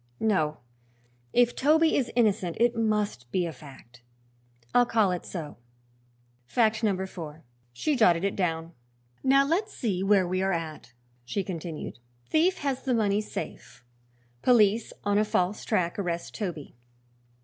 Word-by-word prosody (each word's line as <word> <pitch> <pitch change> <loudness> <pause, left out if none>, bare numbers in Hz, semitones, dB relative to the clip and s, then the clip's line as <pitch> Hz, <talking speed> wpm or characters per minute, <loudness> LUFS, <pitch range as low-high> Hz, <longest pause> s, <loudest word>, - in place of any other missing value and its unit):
No, 155 -9 +1 0.7
if 245 0 +3
Toby 315 +3 +4
is 255 -3 +1
innocent 205 -7 +1
it 240 +1 +3
must 210 - -1
be 180 -2 +1
a 165 - -3
fact. 125 -3 -15 0.7
I'll 245 -1 +5
call 215 -5 +3
it 180 - -4
so 160 -5 -6 0.9
Fact 220 - +2
number 190 -3 +1
four." 160 -4 -9 0.3
She 290 - -1
jotted 180 -8 +4
it 200 - 0
down. 165 -2 -2 0.5
"Now 275 +1 +5
let's 380 +8 -1
see 200 -7 -1
where 195 -2 +3
we 185 +1 -1
are 195 0 +1
at," 155 -8 -5 0.3
she 195 +11 -2
continued. 165 -7 -6 0.3
"Thief 350 - +2
has 275 -2 -1
the 260 -2 0
money 210 -2 +2
safe; 165 - -8 0.6
police 225 -2 +4
on 205 0 +2
a - - +4
false 205 -1 0
track 180 -4 0
arrest 170 -3 -3
Toby. 175 - -5
200 Hz, 145 wpm, -27 LUFS, 170-230 Hz, 0.9 s, I'll